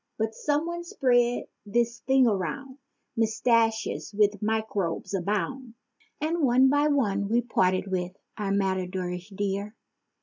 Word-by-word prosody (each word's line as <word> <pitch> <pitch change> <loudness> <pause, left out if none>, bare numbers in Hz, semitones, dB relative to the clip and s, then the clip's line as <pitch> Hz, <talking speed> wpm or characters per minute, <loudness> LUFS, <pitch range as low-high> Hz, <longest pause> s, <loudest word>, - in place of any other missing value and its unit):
But 220 0 -1
some 295 +6 0
one 345 0 -4
spread 245 -7 +2 0.2
this 235 +3 0
thing 265 -1 +3
around—"Mustaches 225 -1 -1
with 205 -1 +3
microbes 210 -5 -2
abound!" 220 +6 -2 0.4
And 320 +3 -1
one 260 -1 +5
by 290 +2 +3
one 205 -9 +1
we 235 +2 +3
parted 185 -6 +1
with 185 -2 -2 0.2
our 200 -2 -2
matadorish 185 -1 -2
dear. 200 +1 -3
220 Hz, 115 wpm, -27 LUFS, 195-255 Hz, 0.4 s, one